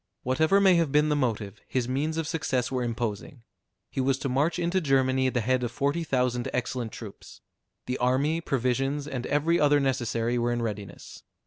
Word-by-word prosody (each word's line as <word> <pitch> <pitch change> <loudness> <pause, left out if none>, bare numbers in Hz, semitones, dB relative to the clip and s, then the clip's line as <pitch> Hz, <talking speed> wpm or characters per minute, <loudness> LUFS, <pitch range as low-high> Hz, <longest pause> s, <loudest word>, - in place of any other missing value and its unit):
Whatever 160 +9 +3
may 190 -3 +5
have 165 -4 +1
been 150 +1 +3
the 150 - +2
motive, 110 -6 -2
his 125 -2 -1
means 150 +5 -1
of 165 - -1
success 130 -6 -1
were 130 -1 -1
imposing. 115 +1 -4 0.5
He 135 - -1
was 130 0 +1
to 135 - -3
march 150 +7 +1
into 175 +2 0
Germany 130 -3 +2
at 130 - -3
the 120 - +2
head 130 +3 +1
of 120 -2 -2
forty 140 +6 -1
thousand 125 -4 0
excellent 125 -2 -2
troops. 105 -4 -11 0.4
The 125 +1 -3
army, 140 +6 +1
provisions, 135 +1 -1
and 130 -4 -4
every 155 +4 +2
other 145 0 +4
necessary 120 -3 0
were 120 0 0
in 120 0 -1
readiness. 105 -3 -6
130 Hz, 190 wpm, -27 LUFS, 120-150 Hz, 0.5 s, may